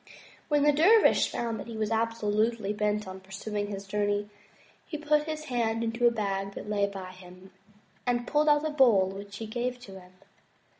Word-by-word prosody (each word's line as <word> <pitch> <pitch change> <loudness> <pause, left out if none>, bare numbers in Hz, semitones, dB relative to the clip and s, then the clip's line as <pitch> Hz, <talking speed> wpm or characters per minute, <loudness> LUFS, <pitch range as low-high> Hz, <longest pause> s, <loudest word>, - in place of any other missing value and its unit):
When 295 -2 +2
the 295 - +6
dervish 380 +10 +5
found 230 -2 -3
that 200 - -7
he 230 -1 -7
was 215 0 -1
absolutely 220 -1 0
bent 210 -1 -1
on 190 0 -7
pur 190 0 -23
suing 205 +1 -4
his 200 -1 -6
journey, 205 +1 -1 0.6
he 305 - -4
put 300 0 +1
his 310 -1 -4
hand 230 -4 -1
into 230 +1 +2
a - - +4
bag 200 -3 -3
that - - -7
lay 205 -1 +1
by 190 -2 -7
him, 185 0 -14 0.6
and 240 -1 +1
pulled 300 +4 +2
out 295 +1 +3
a 310 - -1
bowl 235 -10 +4
which 200 +1 -8
he 225 - -5
gave 245 +3 -3
to 195 -5 -10
him. 180 0 -18
215 Hz, 195 wpm, -28 LUFS, 200-245 Hz, 0.6 s, the